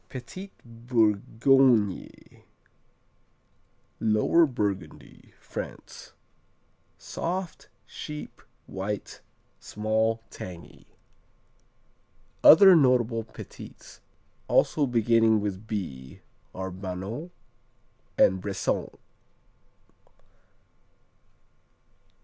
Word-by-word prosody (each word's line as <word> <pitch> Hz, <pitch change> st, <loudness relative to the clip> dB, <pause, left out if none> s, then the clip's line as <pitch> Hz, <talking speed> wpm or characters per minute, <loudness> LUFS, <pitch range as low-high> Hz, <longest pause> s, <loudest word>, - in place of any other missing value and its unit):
Petits 165 Hz, +10 st, -8 dB, 0.2 s
Bourgognes 115 Hz, 0 st, +1 dB, 1.6 s
Lower 110 Hz, +10 st, +3 dB
Burgundy, 100 Hz, -, -5 dB
France -, -, -9 dB, 0.8 s
Soft; 180 Hz, 0 st, -5 dB, 0.2 s
sheep; 150 Hz, -1 st, -9 dB, 0.2 s
white, 100 Hz, +2 st, -5 dB, 0.4 s
small, 110 Hz, +1 st, -1 dB
tangy. 90 Hz, -2 st, -10 dB, 1.6 s
Other 190 Hz, +3 st, +9 dB
notable 125 Hz, -6 st, +3 dB
Petits -, -, -12 dB, 0.5 s
also 145 Hz, -3 st, +2 dB
beginning 115 Hz, -2 st, +3 dB
with 100 Hz, 0 st, -5 dB
B 65 Hz, -12 st, -6 dB, 0.3 s
are 95 Hz, 0 st, -5 dB
Banons 95 Hz, -, -6 dB, 0.9 s
and 95 Hz, -1 st, +4 dB
Bressans. 100 Hz, 0 st, -3 dB
110 Hz, 55 wpm, -27 LUFS, 100-130 Hz, 1.6 s, Other